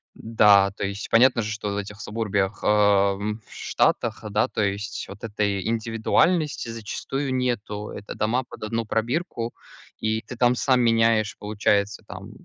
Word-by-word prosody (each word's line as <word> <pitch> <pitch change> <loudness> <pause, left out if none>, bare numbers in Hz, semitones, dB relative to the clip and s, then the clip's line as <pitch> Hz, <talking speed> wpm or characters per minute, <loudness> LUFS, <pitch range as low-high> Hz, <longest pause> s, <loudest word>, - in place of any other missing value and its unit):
Да, 105 -3 +4
то 100 - -4
есть 100 +1 -5
понятно 125 +1 +5
же, 105 0 -3
что 105 -1 -4
в 100 - -3
этих 105 0 -6
сабурбиях, 105 -3 -2
э, - - 0
в 105 0 +2
Штатах, 115 -1 0
да, 105 +2 +2
то - - -3
есть 100 +2 -3
вот 100 0 -11
этой 105 -3 -1
индивидуальности, 115 +7 +1
зачастую, 130 +5 -4
нету. 110 -5 -2
Это 100 - -8
дома 115 +5 0
под - - -10
одну 115 +1 -2
пробирку, 120 +1 -2 0.5
и 110 0 0
ты 125 - -9
там 120 +1 +3
сам 130 0 +2
меняешь, 115 -2 +3
получается, 105 0 0
там, - - -9
110 Hz, 155 wpm, -24 LUFS, 105-115 Hz, 0.5 s, понятно